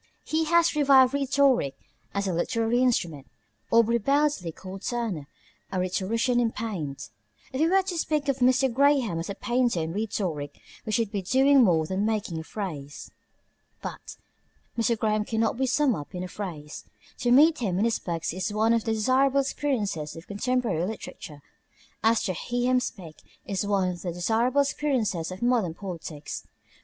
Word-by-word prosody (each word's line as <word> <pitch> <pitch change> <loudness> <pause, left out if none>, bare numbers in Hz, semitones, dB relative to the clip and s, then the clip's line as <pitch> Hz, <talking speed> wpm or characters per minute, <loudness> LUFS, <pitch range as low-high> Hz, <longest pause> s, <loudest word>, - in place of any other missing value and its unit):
He 320 +1 0
has 340 0 +3
revived 270 -3 +5
rhetoric 275 - +2 0.4
as 200 0 -2
a 185 - 0
literary 225 +7 +1
instrument. 170 - 0 0.4
Aubrey 230 +1 +4
Beardsley 275 - +1
called 190 +3 -9
Turner 220 - -3 0.4
a 190 - -1
rhetorician 225 +7 0
in 235 -2 +1
paint. 180 -13 -5 0.4
If 260 - -1
we 320 - +4
were 385 +1 +4
to 365 -2 -4
speak 300 -2 -1
of 275 -1 0
Mr. 255 0 +3
Graham 270 - +3
as 165 - -5
a 200 - -4
painter 240 -5 0
in 160 0 -3
rhetoric, 180 -9 -3 0.3
we - - -1
should 220 -1 0
be 205 -3 -2
doing 265 +7 +5
more 165 -6 +3
than 190 +4 -1
making 210 -6 -1
a - - -6
phrase. 155 -8 -6 0.7
But - - -7 0.6
Mr. 230 0 +1
Graham 215 -1 +1
cannot 225 +1 0
be 265 0 +1
summed 265 0 +2
up 150 +2 -8
in 180 - -3
a - - -4
phrase. 165 -7 -7 0.4
To 245 - 0
meet 305 +6 +6
him 195 -7 -1
in 205 - +2
his 230 - +1
books 165 -2 -3
is 185 +2 -2
one 220 +2 +2
of 230 0 0
the 225 - +1
desirable 260 +5 +3
experiences 210 - -2
of 165 - -10
contemporary 220 -4 -1
literature, 175 -6 -7 0.6
as 225 0 +3
to 185 - -1
hear 245 +7 -1
him 255 - +4
speak 170 -10 -7 0.3
is 200 0 -2
one 195 -3 +2
of 175 -1 -6
the 175 - -3
desirable 225 +10 +1
experiences 245 - -1
of 185 +5 -6
modern 230 -9 +1
politics. 170 -6 -7
220 Hz, 170 wpm, -26 LUFS, 180-255 Hz, 0.7 s, meet